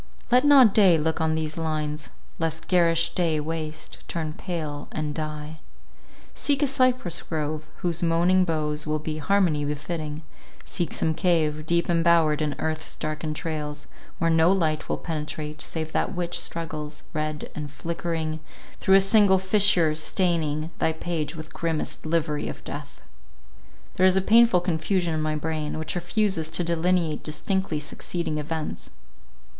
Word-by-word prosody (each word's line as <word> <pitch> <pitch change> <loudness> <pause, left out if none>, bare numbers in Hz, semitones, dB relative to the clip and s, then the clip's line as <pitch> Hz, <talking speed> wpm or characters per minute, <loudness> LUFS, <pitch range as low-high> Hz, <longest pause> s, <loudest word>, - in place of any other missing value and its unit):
Let 250 +2 +6
not 270 -7 +7
day 190 -6 +6
look 160 +1 -1
on 160 0 +1
these 155 0 -3
lines, 150 -3 -2 0.3
lest 160 -1 -3
garish 170 -2 +3
day 165 -4 +1
waste, 155 0 -5
turn 160 -2 -3
pale, 155 -4 -5
and 155 -1 -3
die. 155 0 -5 0.7
Seek 285 -1 0
a - - +5
cypress 255 - +1
grove, 155 -1 -3 0.2
whose 170 -2 0
moaning 175 +2 +3
boughs 155 -3 -1
will 155 0 +1
be 155 0 -4
harmony 170 -3 +2
befitting; 155 +1 -4 0.4
seek 175 -3 -2
some 160 - +1
cave, 155 -3 +1
deep 170 +1 +2
embowered 165 -3 +3
in 150 -1 -1
earth's 160 0 -3
dark 155 0 -4
entrails, 150 -1 -4 0.3
where 165 0 +1
no 165 +2 +5
light 160 -5 0
will - - 0
penetrate, 150 -1 -5
save 160 -1 -5
that - - -1
which 175 0 -1
struggles, 155 -2 -5
red 155 -1 -3
and 150 -1 -5
flickering, 165 0 -3 0.4
through 190 - +4
a 195 - +7
single 195 -1 +5
fissure, 190 -4 +4
staining 160 -1 0
thy 160 - +2
page 160 -1 -3
with 155 -1 -9
grimmest 160 -1 -2
livery 155 -2 0
of - - -8
death. - - -8 0.9
There 185 - +4
is 185 - +4
a - - +4
painful 225 -2 +5
confusion 175 0 0
in 155 - -1
my 155 0 -1
brain, 155 0 -3
which 155 0 -3
refuses 175 -2 0
to 165 +2 0
delineate 170 -1 +1
distinctly 180 +1 -1
succeeding 155 +1 -3
events. 155 +1 -4
160 Hz, 150 wpm, -25 LUFS, 155-175 Hz, 0.9 s, not